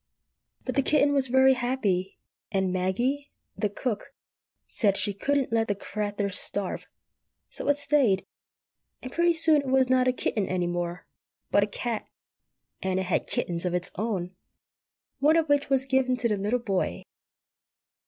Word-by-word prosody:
But 255 Hz, -, -2 dB
the 275 Hz, -, +3 dB
kitten 290 Hz, 0 st, +3 dB
was 275 Hz, -2 st, +3 dB
very 265 Hz, +1 st, +5 dB
happy, 235 Hz, -7 st, -1 dB, 0.3 s
and 190 Hz, -2 st, 0 dB
Maggie, 240 Hz, +11 st, -1 dB, 0.2 s
the 210 Hz, 0 st, -1 dB
cook, 215 Hz, +1 st, -4 dB, 0.5 s
said 200 Hz, -4 st, +1 dB
she 205 Hz, -, +1 dB
"couldn't 275 Hz, +5 st, 0 dB
let 225 Hz, -1 st, +2 dB
the 205 Hz, -, 0 dB
crathur 205 Hz, 0 st, -3 dB
starve," 200 Hz, 0 st, 0 dB, 0.6 s
so -, -, -3 dB
it 285 Hz, 0 st, +3 dB
stayed; 280 Hz, -9 st, +2 dB, 0.8 s
and 255 Hz, -, -6 dB
pretty 340 Hz, 0 st, +3 dB
soon 315 Hz, -2 st, +5 dB
it 280 Hz, -, -8 dB
was 260 Hz, -1 st, +3 dB
not 255 Hz, 0 st, +3 dB
a -, -, +5 dB
kitten 215 Hz, -5 st, -1 dB
any 180 Hz, -1 st, -1 dB
more, 175 Hz, 0 st, -3 dB, 0.5 s
but 200 Hz, -, +4 dB
a -, -, -1 dB
cat, 225 Hz, +2 st, -4 dB, 0.7 s
and 190 Hz, 0 st, 0 dB
it -, -, -1 dB
had 180 Hz, -, -1 dB
kittens 170 Hz, -1 st, -2 dB
of 180 Hz, -1 st, -1 dB
its 180 Hz, 0 st, -1 dB
own, 190 Hz, -4 st, -3 dB, 0.8 s
one 300 Hz, +4 st, +4 dB
of 325 Hz, -1 st, +2 dB
which 285 Hz, -1 st, +2 dB
was 270 Hz, -1 st, +2 dB
given 260 Hz, -1 st, +1 dB
to 245 Hz, -, 0 dB
the 215 Hz, -, +1 dB
little 205 Hz, +5 st, 0 dB
boy. 195 Hz, -, -2 dB
230 Hz, 165 wpm, -27 LUFS, 190-265 Hz, 0.8 s, very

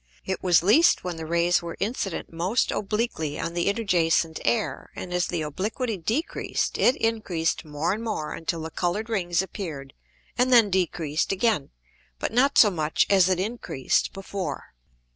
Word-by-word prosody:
It -, -, -3 dB
was 175 Hz, -3 st, +4 dB
least 285 Hz, -, +5 dB
when 180 Hz, -2 st, -4 dB
the 160 Hz, -1 st, -6 dB
Rays 170 Hz, +1 st, +2 dB
were 170 Hz, -1 st, -7 dB
incident 195 Hz, -6 st, -3 dB
most 180 Hz, +8 st, 0 dB
obliquely 205 Hz, -8 st, -2 dB
on 170 Hz, -, -3 dB
the 175 Hz, 0 st, -1 dB
interjacent 170 Hz, -6 st, +1 dB
Air, 225 Hz, -3 st, -1 dB
and 180 Hz, -, -6 dB
as 180 Hz, -1 st, +1 dB
the 170 Hz, -3 st, -2 dB
obliquity 210 Hz, -, -3 dB
decreased 225 Hz, -, -2 dB
it 255 Hz, -, +4 dB
increased 195 Hz, -8 st, -1 dB
more 150 Hz, +4 st, -1 dB
and 220 Hz, +2 st, -5 dB
more 210 Hz, -9 st, -3 dB
until 165 Hz, 0 st, -3 dB
the 160 Hz, -, -6 dB
colour'd 190 Hz, +8 st, -2 dB
Rings 175 Hz, -4 st, +1 dB
appear'd, 155 Hz, -9 st, -7 dB, 0.5 s
and 255 Hz, +1 st, +3 dB
then 230 Hz, -5 st, +6 dB
decreased 165 Hz, -4 st, 0 dB
again, 195 Hz, -6 st, +1 dB, 0.5 s
but -, -, -3 dB
not 275 Hz, +4 st, +3 dB
so 210 Hz, -, +7 dB
much 155 Hz, -3 st, +1 dB
as 190 Hz, -2 st, +5 dB
it 185 Hz, -1 st, +1 dB
increased 195 Hz, -, -1 dB
before. 190 Hz, -5 st, -6 dB
180 Hz, 160 wpm, -25 LUFS, 165-215 Hz, 0.5 s, so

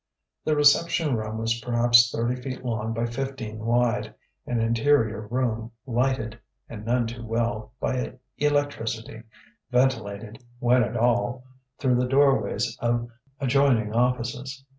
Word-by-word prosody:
The 155 Hz, -, +2 dB
reception 150 Hz, 0 st, +3 dB
room 110 Hz, 0 st, -3 dB
was 115 Hz, +1 st, -1 dB
perhaps 120 Hz, 0 st, +5 dB
thirty 120 Hz, +2 st, -1 dB
feet 130 Hz, 0 st, -7 dB
long 110 Hz, -2 st, -2 dB
by 115 Hz, +1 st, -1 dB
fifteen 120 Hz, -3 st, -5 dB
wide: 120 Hz, +1 st, 0 dB, 0.3 s
an 120 Hz, -1 st, 0 dB
interior 115 Hz, -2 st, +2 dB
room, 115 Hz, -1 st, -2 dB
lighted, 120 Hz, -2 st, -1 dB, 0.3 s
and 105 Hz, -2 st, -8 dB
none 120 Hz, +1 st, +1 dB
too 115 Hz, +1 st, -6 dB
well, 115 Hz, -1 st, -2 dB
by 125 Hz, -1 st, -2 dB, 0.3 s
electricity, 140 Hz, -7 st, -1 dB, 0.5 s
ventilated, 115 Hz, -3 st, -1 dB
when 125 Hz, +1 st, +3 dB
at -, -, -3 dB
all, 120 Hz, +1 st, +1 dB, 0.3 s
through 125 Hz, -3 st, +2 dB
the 125 Hz, -, +1 dB
doorways 135 Hz, -5 st, +2 dB
of 120 Hz, 0 st, 0 dB, 0.3 s
adjoining 130 Hz, -5 st, +2 dB
offices. 125 Hz, +2 st, -1 dB
120 Hz, 125 wpm, -25 LUFS, 115-130 Hz, 0.5 s, perhaps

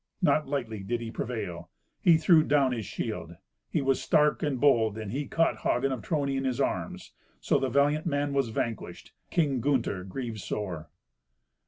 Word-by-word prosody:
Not 155 Hz, -2 st, +2 dB
lightly 120 Hz, -7 st, -3 dB
did 120 Hz, +5 st, -2 dB
he 115 Hz, -1 st, -6 dB
prevail. 105 Hz, -8 st, -5 dB, 0.3 s
He 170 Hz, -2 st, +6 dB
threw 160 Hz, 0 st, +5 dB
down 145 Hz, -3 st, +3 dB
his 115 Hz, -5 st, -3 dB
shield. 85 Hz, -7 st, -5 dB, 0.3 s
He 155 Hz, -, 0 dB
was 135 Hz, -1 st, +1 dB
stark 150 Hz, 0 st, +3 dB
and 145 Hz, -5 st, -1 dB
bold, 115 Hz, -6 st, +3 dB
and 110 Hz, -3 st, -5 dB
he 140 Hz, +3 st, -3 dB
caught 165 Hz, +4 st, +1 dB
Hagen 135 Hz, +3 st, +1 dB
of 130 Hz, -4 st, -3 dB
Trony 140 Hz, -2 st, -1 dB
in 135 Hz, -, -1 dB
his 130 Hz, -2 st, -1 dB
arms. -, -, -2 dB, 0.3 s
So -, -, +2 dB
the 135 Hz, -1 st, 0 dB
valiant 145 Hz, +4 st, +2 dB
man 145 Hz, -2 st, 0 dB
was 135 Hz, -4 st, +1 dB
vanquished. 110 Hz, 0 st, -4 dB, 0.2 s
King 145 Hz, -7 st, +1 dB
Gunther 120 Hz, -9 st, 0 dB
grieved 115 Hz, +2 st, -5 dB
sore. 90 Hz, -7 st, -4 dB
130 Hz, 175 wpm, -28 LUFS, 110-145 Hz, 0.3 s, He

